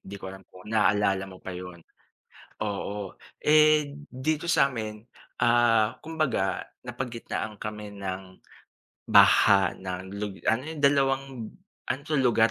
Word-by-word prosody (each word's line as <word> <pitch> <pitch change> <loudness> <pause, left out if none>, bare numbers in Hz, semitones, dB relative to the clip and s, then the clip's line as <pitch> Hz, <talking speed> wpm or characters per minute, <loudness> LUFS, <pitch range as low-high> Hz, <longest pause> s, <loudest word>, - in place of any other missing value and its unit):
'di 100 +1 -9
ko 95 -1 -8
alam 95 - -11
kung 90 +1 -15
naalala 105 -3 +2
mo 95 - -11
pa 95 - -8
yun. 90 -1 -9 0.8
Oo, 100 -1 -4 0.2
eh, 150 -1 +4 0.2
dito 150 +5 -1
sa 140 -5 +4
'min, 110 -4 -5 0.4
ah 115 -2 +3
kumbaga 155 -12 -1 0.2
napagitnaan 120 -3 -5
kami 105 -1 -7
ng 95 -1 -6 0.7
baha 95 -3 +6
ng 95 +1 -6
lug 105 -2 -4 0.2
ano 115 +3 0
yung 160 -2 -6
dalawang 135 -1 +3 0.6
ano 135 - -2
'to 150 -1 -1
lugar 115 -3 +4
110 Hz, 130 wpm, -27 LUFS, 95-135 Hz, 0.8 s, baha